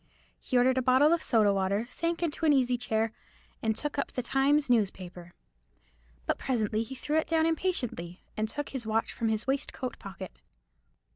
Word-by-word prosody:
He 255 - 0
ordered 255 +1 +4
a - - +1
bottle 260 +5 +5
of 340 - +1
soda 215 -4 +3
water, 195 +3 0
sank 335 +1 -1
into 330 0 -2
an 300 - +6
easy 250 -2 +3
chair, 225 -2 0 0.5
and 220 -1 +1
took 295 +2 -3
up - - -2
the 250 - -3
Times 280 +4 +2
newspaper. 185 -7 -1 0.9
But - - 0
presently 220 -4 0
he 230 +4 -6
threw 300 +4 -1
it - - -2
down 320 -1 +2
impatiently, 260 - -2
and 215 0 -1
took 290 +5 -4
his 255 -5 -5
watch 225 +1 0
from 225 - -1
his 220 0 -1
waistcoat 265 -2 -2
pocket. 195 -1 -8
245 Hz, 180 wpm, -29 LUFS, 215-285 Hz, 0.9 s, an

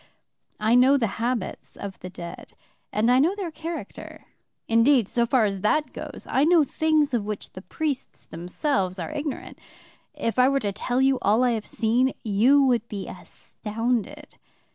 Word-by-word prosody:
I 215 +2 +2
know 255 +3 +6
the 245 - +1 0.2
habits 240 -4 -3
of 195 -1 -8
the 185 - -8
dead, 170 -2 -9 0.4
and 225 +3 +2
I 250 - +5
know 335 +8 +3
their 380 -5 -4
character. 325 +2 -8 0.4
Indeed, 230 0 +4
so 235 +1 0
far 240 -2 +3
as 195 -2 -2
that 300 +9 +1
goes, - - -8
I 270 - +2
know 330 0 +5
things 305 0 +1
of 235 -4 +1
which 210 -1 -5
the 185 - -9
priests 285 +5 -4
themselves 185 - -2
are 185 - -5
ignorant. 295 -2 -5 0.6
If 230 +1 -2
I 250 +1 +6
were 275 0 +2
to 205 -2 -1
tell 245 +6 -1
you 270 -1 +3
all 215 +5 +3
I 250 - +3
have 220 -2 -3
seen, 245 +4 +1
you 235 +7 +4
would 240 -4 +2
be 200 -4 -6
astounded. 240 +6 -5
245 Hz, 170 wpm, -25 LUFS, 210-285 Hz, 0.6 s, know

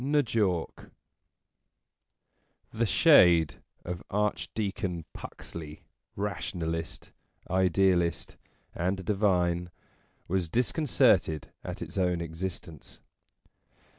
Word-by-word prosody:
N' 145 +2 +3
JAWK 100 -7 -1 1.8
THE 115 +1 0
shade 85 - +5 0.2
of 90 0 -4
Archdeacon 100 -3 -2
Puxley, 75 -2 -9 0.3
rationalist, 85 -5 -4 0.4
idealist, 90 -2 +2 0.4
and 95 +1 -2
divine, 90 -4 +1 0.6
was 90 -2 -1
disconcerted 120 - +2
at - - -5
its - - -5
own 90 -2 +1
existence. 85 -2 -6
90 Hz, 75 wpm, -29 LUFS, 85-105 Hz, 1.8 s, shade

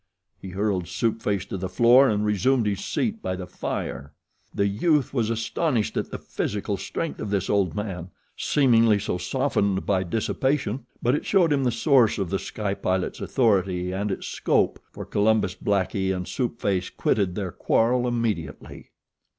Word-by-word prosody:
He 95 - -7
hurled 95 -2 -1
Soup 115 -1 -1
Face 100 -3 -1
to - - -5
the 95 0 -4
floor 120 +8 +6
and 105 0 0
resumed 110 +4 +2
his 100 -2 -1
seat 225 -1 -2
by 95 - -2
the 90 0 -6
fire. 70 -5 -5 0.4
The 100 - 0
youth 135 - +1
was 115 -5 0
astonished 115 +2 -1
at - - -2
the - - -5
physical 105 0 -3
strength 150 - -4
of 105 - -3
this 100 -2 0
old 100 -3 +1
man, 95 -4 -4 0.3
seemingly 115 -6 +4
so 90 -2 -2
softened 100 -2 0
by 95 -2 +2
dissipation; 130 - -1 0.2
but 120 - +3
it 145 - -2
showed 175 -6 +4
him 140 -1 +1
the 125 - +2
source 120 -1 +3
of 95 -4 -2
The 95 - 0
Sky 105 -2 -3
Pilot's 95 -1 -2
authority 95 -7 +1
and 100 +2 -2
its 95 - -4
scope, - - +1
for - - -8
Columbus 105 -2 +2
Blackie 95 0 0
and 90 -1 -3
Soup 120 -3 -2
Face 95 -2 0
quitted 95 -4 0
their 95 -4 -3
quarrel 125 +6 +1
immediately. 110 -11 -3
105 Hz, 170 wpm, -25 LUFS, 95-120 Hz, 0.4 s, floor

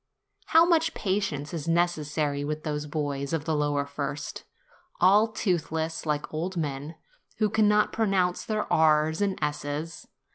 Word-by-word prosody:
How 325 +1 +6
much 325 -2 +2
patience 185 -7 -2
is 160 -2 -4
necessary 155 -4 0
with 155 +1 -3
those 150 -1 -3
boys 145 -1 -3
of 155 -2 -1
the 160 - 0
lower 145 -1 0
first, 140 0 -5 0.5
all 200 +5 +5
toothless, 165 -6 -2
like 150 0 -2
old 175 +4 -3
men, 145 0 -3 0.4
who 215 -2 +1
can 220 -1 +3
not 210 0 +3
pronounce 195 -5 +1
their 215 -1 -1
r's 155 +1 +3
and 200 -2 0
s's! 150 +2 -4
160 Hz, 145 wpm, -27 LUFS, 150-190 Hz, 0.5 s, How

